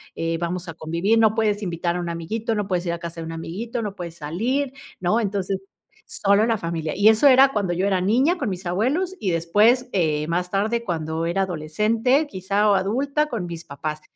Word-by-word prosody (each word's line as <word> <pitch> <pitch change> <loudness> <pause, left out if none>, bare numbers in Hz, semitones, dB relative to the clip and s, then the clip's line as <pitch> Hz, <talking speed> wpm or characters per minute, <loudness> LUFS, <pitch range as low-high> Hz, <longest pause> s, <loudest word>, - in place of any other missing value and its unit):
eh, 165 0 -2
vamos 175 +1 -3
a 165 - -6
convivir, 170 +8 0
no 220 -1 +4
puedes 215 -2 +1
invitar 170 -2 -2
a - - -2
un 175 -1 -3
amiguito, 215 +7 -3
no 205 -2 -2
puedes 180 -2 -1
ir 170 - 0
a - - -3
casa 170 -1 -7
de - - -5
un 165 - -6
amiguito, 210 +9 -5
no 205 -2 -4
puedes 170 -3 -7
salir, 240 - -2 0.3
¿no? 185 +6 +1
Entonces, 195 -3 -2 0.5
solo 200 +2 +2
la 225 -1 +1
familia. 165 -4 -3
Y 205 +2 +6
eso 220 +6 +5
era 265 0 +7
cuando 195 -4 0
yo 185 +3 0
era 190 -2 +1
niña, 260 - +2
con 255 - -1
mis 185 0 -5
abuelos, 260 - 0
y 195 - -1
después, 210 +10 +3
eh, 155 -5 0
más 180 +1 -1
tarde, 220 +5 0
cuando 165 -4 -2
era 190 +3 +1
adolescente, 215 - +1
quizá, 200 -1 0
o - - +5
adulta, 275 +10 0
con 230 -10 -4
mis 170 -1 -7
papás. 150 +2 -5
195 Hz, 210 wpm, -23 LUFS, 170-225 Hz, 0.5 s, era